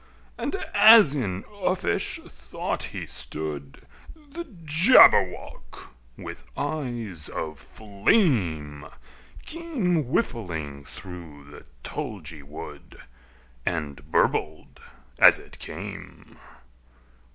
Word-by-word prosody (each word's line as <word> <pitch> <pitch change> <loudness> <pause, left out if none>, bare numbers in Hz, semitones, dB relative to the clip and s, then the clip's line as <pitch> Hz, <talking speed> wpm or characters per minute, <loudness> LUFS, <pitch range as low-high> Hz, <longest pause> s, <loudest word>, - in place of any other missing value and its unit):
And - - -3 0.2
as 210 -6 +8
in 100 -9 -3 0.2
uffish 185 0 0
thought 60 0 -5
he - - -6
stood, 75 -3 -6 0.3
The 315 +2 -9 0.2
Jabberwock, 150 - +4 0.2
with - - -9
eyes 120 - -4
of 75 -3 -5
flame, 100 - 0 0.6
Came 245 - -1
whiffling 85 - -3
through 80 -5 -11
the 75 - -13 0.2
tulgey 100 - -6
wood, 70 +2 -11 0.6
And 75 -4 -4
burbled 75 0 0 0.4
as - - +8
it - - -13
came! - - -9
95 Hz, 85 wpm, -25 LUFS, -, 0.6 s, as